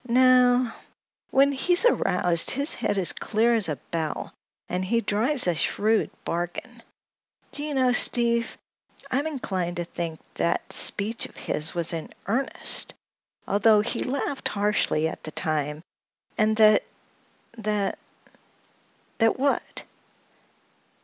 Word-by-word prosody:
"No; 250 -1 +4 0.6
when 275 +1 +4
he's 350 - +2
aroused 180 - +2
his 280 +3 +1
head 215 -3 -2
is 185 -3 +2
clear 225 +2 +1
as 215 -7 +1
a 150 - -1 0.2
bell 160 -2 -3 0.3
and 180 +1 -2
he 230 +5 +1
drives 235 +6 0
a 175 - +2
shrewd 210 +7 +1 0.2
bargain. 175 +8 -4 0.7
Do 290 - -1
you 300 -1 -3
know, 255 -1 +3
Steve, 235 -1 +2 0.5
I'm 280 +4 0
inclined 190 - -3
to 175 - -1
think 165 -1 -5
that 170 - -1
speech 215 +3 0
of - - -21
his 150 +3 -3
was 170 -1 +1
in 165 -1 -5
earnest, 240 +8 +1 0.5
although 210 +1 +4
he - - -3
laughed 275 +1 -2
harshly 205 -6 +1
at - - -7
the - - -7
time, 155 -1 -2 0.5
and 215 0 +2
that—that—" 215 -1 -1 1.2
"That 225 -1 +3
what?" 280 +1 -1
215 Hz, 125 wpm, -25 LUFS, 175-250 Hz, 1.2 s, No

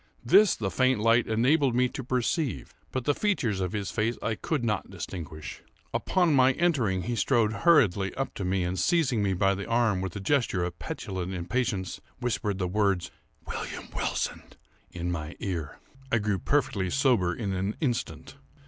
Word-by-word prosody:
This 210 -2 +6
the 95 -4 -3
faint 130 -2 +2
light 115 +2 +3
enabled 125 +4 +3
me 125 +1 +4
to 130 - -6
perceive; 125 - -1 0.2
but 130 - -2
the 145 - +3
features 140 - 0
of 90 -1 -2
his 100 -4 -3
face 110 +6 0
I 115 - 0
could 130 +3 -2
not 105 -3 -1
distinguish. 85 -4 -7 0.3
Upon 175 -4 +2
my 130 -1 +5
entering 125 - +1
he 120 - -2
strode 115 -3 +2
hurriedly 110 - +3
up 135 -1 -3
to 100 - -5
me, 95 0 0
and, 90 +1 -2
seizing 150 - +2
me 100 -2 +1
by 95 +1 +2
the 100 +1 -5
arm 115 -5 +2
with 95 -2 -4
a - - -3
gesture 110 -5 +1
of 90 0 -4
petulant 95 -1 -4
impatience, 95 +1 -2 0.2
whispered 115 -5 -1
the 90 -1 -1
words 100 -1 0 0.3
"William - - -6
Wilson!" - - -2 0.5
in 90 0 -4
my 80 -3 -4
ear. 85 -6 -4 0.3
I 120 - +4
grew 105 -3 0
perfectly 100 -7 0
sober 120 -8 +2
in 100 -1 -3
an 95 +3 -2
instant. 130 -1 -3
105 Hz, 175 wpm, -28 LUFS, 95-130 Hz, 0.5 s, This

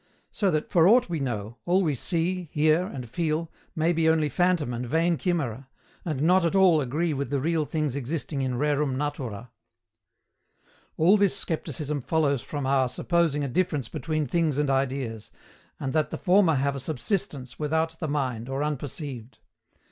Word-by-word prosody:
So 200 -3 +1
that, 155 -3 -1
for 170 -1 +5
aught 235 0 +5
we 165 -2 -2
know, 115 -4 -4
all 185 +2 +3
we 155 -4 +1
see, 175 +5 -1
hear, 155 +4 +3
and 125 -7 -7
feel 160 +5 -2 0.2
may 165 +2 +2
be 160 -1 +2
only 160 -2 +2
phantom 175 -4 +1
and 120 +1 -3
vain 165 +7 +1
chimera, 140 - -2 0.4
and 150 -5 -2
not 180 +3 +4
at 170 +3 +1
all 180 -5 +5
agree 150 +5 -1
with 140 -2 -3
the 140 0 0
real 160 +2 0
things 150 -4 -2
existing 140 +1 -3
in 130 -1 -1
rerum 145 -1 +1
natura. 125 -6 -4 1.5
All 180 +7 +5
this 200 -1 +2
scepticism 150 -5 -3
follows 140 -2 +1
from 145 -3 -5
our 135 -1 +2
supposing 165 -1 0
a - - -1
difference 145 -3 -1
between 155 +1 -2
things 160 -3 0
and 145 -2 +1
ideas, 130 -5 -2 0.5
and 135 -2 -3
that 155 -1 +1
the - - -4
former 185 -4 +4
have 140 +1 0
a - - -4
subsistence 135 - -3
without 160 +2 -1
the 160 - -2
mind 130 -5 -2
or 135 +2 -1
unperceived. 140 -4 -5
150 Hz, 170 wpm, -26 LUFS, 135-165 Hz, 1.5 s, for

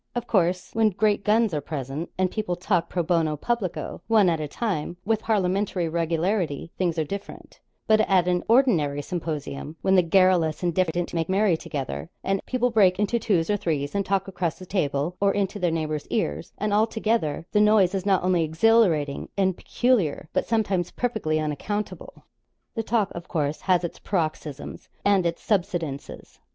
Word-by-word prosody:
Of 240 - -2
course, 180 -3 +1
when 225 -1 +3
great 205 +1 +1
guns 215 -1 +3
are 150 - -1
present, 140 +2 -5
and 185 -1 +1
people 210 -5 -2
talk 175 -1 0
pro 175 - -1
bono 160 -3 +1
publico, 215 0 -3
one 210 -6 +4
at 165 - -1
a 150 - -3
time, 175 -2 -3
with 220 0 +1
parliamentary 190 -3 0
regularity, 165 0 -1
things 175 -3 -1
are 160 - +2
different; 195 +6 -8 0.3
but 215 0 +4
at 185 -2 +4
an 180 -1 +1
ordinary 170 - +3
symposium, 155 -4 -5
when 190 - +3
the 185 - +6
garrulous 175 -2 +3
and 175 -1 +1
diffident 175 0 0
make 165 0 -1
merry 195 -1 +3
together, 130 - -5
and 195 0 -1
people 250 -1 +1
break 195 -5 +4
into 210 +4 +1
twos 185 -7 +1
or 205 - +1
threes 155 -8 -2
and 200 0 0
talk 195 0 0
across 175 -3 -2
the 185 - -10
table, 155 -2 -1
or 200 -1 +3
into 205 0 -1
their 180 -2 +1
neighbours' 155 -2 -2
ears, 75 +2 -2
and 210 0 -1
all 215 +2 +4
together, 220 -9 -1
the 210 - +3
noise 210 -3 +4
is 195 -2 -1
not 195 -3 +2
only 180 -2 +2
exhilarating 160 -4 +2
and 190 -2 +2
peculiar, 210 - 0
but - - 0
sometimes 195 -6 0
perfectly 220 -11 -1
unaccountable. 175 +8 -4 0.5
The 225 - -2
talk, 220 -2 0
of 170 +1 -8
course, 150 -3 -2
has 180 -2 +2
its 170 - -5
paroxysms 155 -5 -4 0.2
and 195 -3 +4
its 170 - -4
subsidences. 175 -8 -3
180 Hz, 175 wpm, -25 LUFS, 160-205 Hz, 0.5 s, the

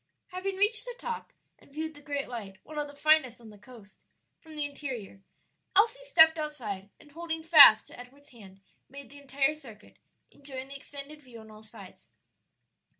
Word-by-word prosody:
Having 375 +1 -4
reached 420 +3 +2
the - - -7
top 475 -2 -6 0.3
and - - -23
viewed 315 +2 -5
the 290 - -15
great 285 -1 -4
light 205 -6 -8
(one 305 -1 -7
of 295 - -3
the 285 - -14
finest 295 -5 +2
on 225 -2 -14
the 210 - -15
coast) 210 -2 -16 0.5
from 320 -2 -14
the 300 -1 -2
interior, 255 -9 -7 0.5
Elsie 455 +5 +3
stepped 320 -8 +5
outside, 220 -11 -6
and 295 - -19
holding 325 0 -5
fast 290 -10 +8
to - - -14
Edward's 280 +4 -15
hand 195 -5 -16 0.3
made 275 0 -12
the 285 - -13
entire 275 +1 0
circuit, 235 -9 -15 0.3
enjoying 270 -2 -9
the 280 - -10
extended 285 +2 -8
view 250 -4 -14
on 220 0 -14
all 215 0 -14
sides. 220 -1 -15
285 Hz, 180 wpm, -28 LUFS, 235-315 Hz, 0.5 s, fast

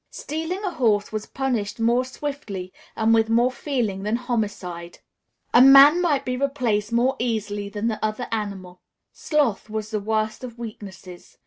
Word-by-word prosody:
Stealing 325 +6 -5
a 380 - -1
horse 210 -8 +1
was 215 -1 -4
punished 235 -4 -2
more 235 +2 +2
swiftly 255 -9 -6 0.2
and 220 +1 +2
with 225 0 +3
more 240 +3 +3
feeling 240 -9 -2
than 210 +3 -1
homicide. 200 -8 -4 0.6
A 240 - +7
man 275 +5 +8
might 300 -6 +1
be 250 - -1
replaced 250 -6 -1
more 245 +3 +2
easily 210 -4 -2
than 210 +2 -3
the 220 -2 -3
other 215 +3 -2
animal. 195 -5 -5 0.3
Sloth 280 -10 0
was 215 0 -4
the 215 - -1
worst 215 +3 -2
of 240 -2 -8
weaknesses. 195 -5 -10
225 Hz, 155 wpm, -23 LUFS, 205-255 Hz, 0.6 s, man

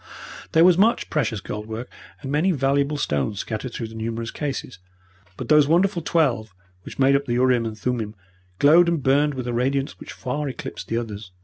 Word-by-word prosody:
There 160 - +6
was 180 -1 +5
much 225 +4 +2
precious 115 -9 -1
gold 105 +2 -6
work 110 +2 -5 0.4
and 135 - -4
many 155 +6 +2
valuable 140 0 +1
stones 75 - -1
scattered 110 +3 -5
through 115 -1 -5
the - - -12
numerous 115 +1 -4
cases, 135 -7 -5 0.6
but - - -6
those 150 -2 +5
wonderful 175 +3 +2
twelve 125 - 0 0.3
which - - -11
made 135 0 +4
up 140 0 0
the 120 - -2
urim 125 -1 +2
and 110 -1 -7
thummim 110 -2 -3 0.4
glowed 165 - +6
and 165 -5 -1
burned 145 +2 +2
with 130 -2 -4
a 120 - -2
radiance 135 +3 -1
which - - -9
far 140 +3 -3
eclipsed 130 - -7
the 115 - -1
others. 105 -4 -6
130 Hz, 195 wpm, -23 LUFS, 115-150 Hz, 0.6 s, There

